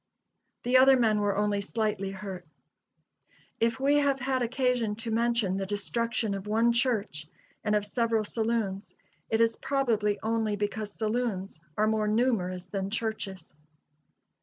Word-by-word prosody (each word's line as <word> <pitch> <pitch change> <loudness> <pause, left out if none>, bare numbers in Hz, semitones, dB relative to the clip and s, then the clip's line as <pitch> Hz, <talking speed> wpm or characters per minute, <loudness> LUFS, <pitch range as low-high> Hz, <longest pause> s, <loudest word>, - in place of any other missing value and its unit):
The 250 +1 +4
other 265 +1 +7
men 220 -3 +3
were 205 -1 0
only 205 -1 +1
slightly 210 -2 -1
hurt. 190 -3 -7 1.1
If 230 +2 +1
we 280 +2 +3
have 280 -2 +2
had 260 0 0
occasion 245 -3 0
to 225 +1 -5
mention 230 -4 +1
the 195 - -2
destruction 220 +2 -1
of 195 +1 -5
one 225 +3 +3
church 220 - 0 0.4
and 210 -1 +1
of 210 -1 +1
several 230 0 0
saloons, 220 -2 -2 0.3
it 225 - +1
is 230 0 +3
probably 225 -7 +1
only 220 -1 0
because 205 +1 -3
saloons 215 -5 -2 0.2
are 215 - +3
more 215 -1 +1
numerous 210 -6 0
than 195 +1 -3
churches. 205 -6 -4
220 Hz, 140 wpm, -28 LUFS, 205-235 Hz, 1.1 s, other